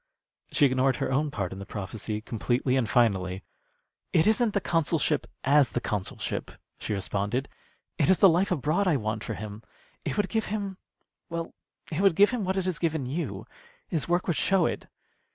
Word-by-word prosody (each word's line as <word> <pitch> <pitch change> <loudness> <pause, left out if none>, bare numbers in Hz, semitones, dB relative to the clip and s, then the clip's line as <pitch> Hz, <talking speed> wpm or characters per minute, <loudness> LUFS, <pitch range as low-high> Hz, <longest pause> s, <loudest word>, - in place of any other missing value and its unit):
She 145 - +4
ignored 130 0 +3
her - - -2
own 145 +3 +1
part 100 -9 -3
in 95 - -8
the 100 - -7
prophecy 105 +1 -4
completely 120 +4 0
and 125 -4 +1
finally. 95 -6 +2 0.7
"It 160 - +4
isn't 220 0 +3
the - - +4
consulship 160 -5 +1 0.2
as 140 0 +4
the - - +1
consulship," 105 -5 -3 0.3
she 105 - -2
responded. 100 +7 -1 0.5
"It 150 - +3
is 190 - +6
the 195 - +7
life 180 +2 +3
abroad 175 +4 +1
I 160 -5 +3
want 110 -1 -3
for 115 - -4
him. 105 +1 -7 0.4
It 140 - -3
would 205 - +2
give 220 -1 0
him 200 -2 -3 0.5
well, 165 -1 -4 0.4
it 160 +4 -1
would 195 -4 +4
give 205 +6 +6
him 245 -4 -1
what 190 +1 -1
it 190 - 0
has 185 -4 -1
given 160 -5 0
you. 150 +7 -4 0.4
His 160 -5 -1
work 175 +1 +2
would 175 - 0
show 190 -4 +3
it." - - -3
145 Hz, 190 wpm, -27 LUFS, 115-180 Hz, 0.7 s, the